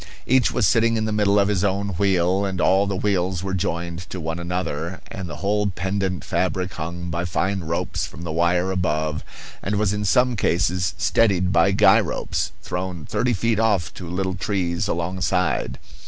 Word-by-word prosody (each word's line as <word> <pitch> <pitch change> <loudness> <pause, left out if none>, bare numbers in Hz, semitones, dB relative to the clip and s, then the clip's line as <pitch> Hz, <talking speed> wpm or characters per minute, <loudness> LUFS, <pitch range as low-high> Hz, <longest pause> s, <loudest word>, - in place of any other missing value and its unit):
Each 130 0 +3
was - - +1
sitting 115 -1 +3
in 110 - 0
the 110 - -1
middle 105 -1 +3
of 100 -1 +4
his 100 -3 +1
own 100 0 0
wheel, 95 0 +2
and 95 -2 -2
all 95 +3 +3
the 100 - -1
wheels 95 -2 0
were 95 0 -3
joined 85 -2 -2
to 95 - -5
one 80 +1 -3
another; 85 -1 -3
and 95 -3 -6
the 75 - -6
whole 105 +6 0
pendent 95 -1 -2
fabric 95 0 -1
hung 85 +1 -5
by 85 +1 -1
fine 95 +3 -1
ropes 85 -1 -2
from 85 - -10
the 85 - -4
wire 85 +3 +2
above, 80 -4 -1 0.4
and 100 - -1
was 100 -1 +1
in 105 0 -2
some 125 +4 +3
cases 90 -3 +1
steadied 95 -4 +2
by 90 +2 +5
guy 100 - +6
ropes, - - -2
thrown 90 -3 -4
thirty 125 0 0
feet 115 +1 +1
off 100 -9 +1
to 90 -3 -8
little 95 +1 -1
trees 90 -3 -1
alongside. 90 -2 -1
95 Hz, 185 wpm, -23 LUFS, 85-100 Hz, 0.4 s, guy